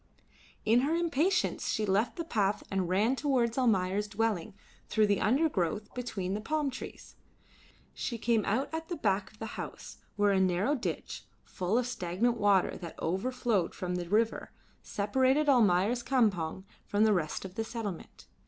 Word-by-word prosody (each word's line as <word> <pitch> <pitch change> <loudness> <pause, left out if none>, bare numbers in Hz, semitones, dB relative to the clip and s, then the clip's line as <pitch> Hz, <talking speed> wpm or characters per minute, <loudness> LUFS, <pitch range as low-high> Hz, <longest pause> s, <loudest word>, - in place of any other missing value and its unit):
In 225 +3 +5
her 290 +6 +1
impatience 340 +2 +1
she 215 - 0
left 205 +4 +1
the 335 - -3
path 210 -10 0
and 190 -3 0
ran 210 +8 +2
towards 255 -5 +1
Almayer's 205 -5 +1
dwelling 205 -4 -1 0.3
through 215 -1 +3
the 205 -1 +1
undergrowth 210 - +1
between 200 -7 -3
the 210 - -2
palm 295 +4 -1
trees. 260 - -9 0.8
She 235 - -4
came 225 -1 +1
out 230 +7 0
at 320 0 -4
the 350 - -2
back 195 -7 0
of 215 - -21
the 225 - -5 0.2
house, - - -9 0.2
where 205 0 +3
a 195 - +3
narrow 190 +8 +2
ditch, 255 -5 -4 0.2
full 185 +5 -1
of 250 - +1
stagnant 230 +1 -1
water 200 -2 +3
that 170 -3 -9
overflowed 205 +1 0
from 180 -2 -3
the 175 -1 -3
river, 220 +3 +1 0.3
separated 260 +8 +1
Almayer's 225 -2 +4
campong 205 -9 +1 0.2
from 205 +1 +2
the 220 -1 +5
rest 170 -1 -2
of 185 - -8
the 225 +2 -2
settlement. 220 -6 -6
215 Hz, 160 wpm, -30 LUFS, 190-250 Hz, 0.8 s, In